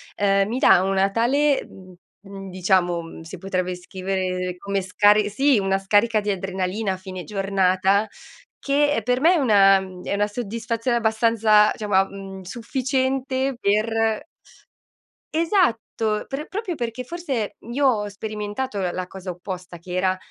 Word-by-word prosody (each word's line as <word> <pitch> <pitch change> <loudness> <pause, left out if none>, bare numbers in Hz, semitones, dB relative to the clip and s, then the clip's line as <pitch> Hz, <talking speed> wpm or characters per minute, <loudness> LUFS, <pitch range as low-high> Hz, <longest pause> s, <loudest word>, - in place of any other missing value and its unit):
ehm, 195 -1 +2
mi 235 +4 -2
dà 185 - +5
una 195 0 +1
tale, 275 +6 +2
mhmm, 185 -1 -14 0.3
mhmm, 195 -1 -9
diciamo, 180 -1 +1
uhm, 165 0 -9
si 165 +4 -9
potrebbe 185 0 -2
scrivere 185 0 -3
come 200 +1 -2
scar 205 +3 +4
sì, 265 +4 +3
una 195 -1 +1
scarica 210 +3 +2
di 205 0 -1
adrenalina 190 +2 -2
a - - -6
fine 185 -1 -8
giornata 195 0 +1 0.5
che, 290 -1 +2
per 250 +1 +1
me, 340 +4 +5
è - - +2
una 200 -8 +5 0.3
è - - -3
una 205 +1 +1
soddisfazione 230 +2 -2
abbastanza, 220 -1 +3
diciamo 210 -2 -5
a 190 0 +5
mhmm, 195 -1 -9
sufficiente 260 +5 -1
per 220 +3 +1 1.1
esatto, 235 - +1
per 285 +3 -5
proprio 400 -2 -4
perché, 240 -1 -4
forse, 270 -7 -4 0.2
io 280 +4 +1
ho 210 -5 +1
sperimentato 210 +3 -4
la 185 +1 -4
cosa 190 0 -9
opposta, 180 0 -7
che 180 +2 -10
era 185 +1 +1
205 Hz, 145 wpm, -23 LUFS, 190-235 Hz, 1.1 s, dà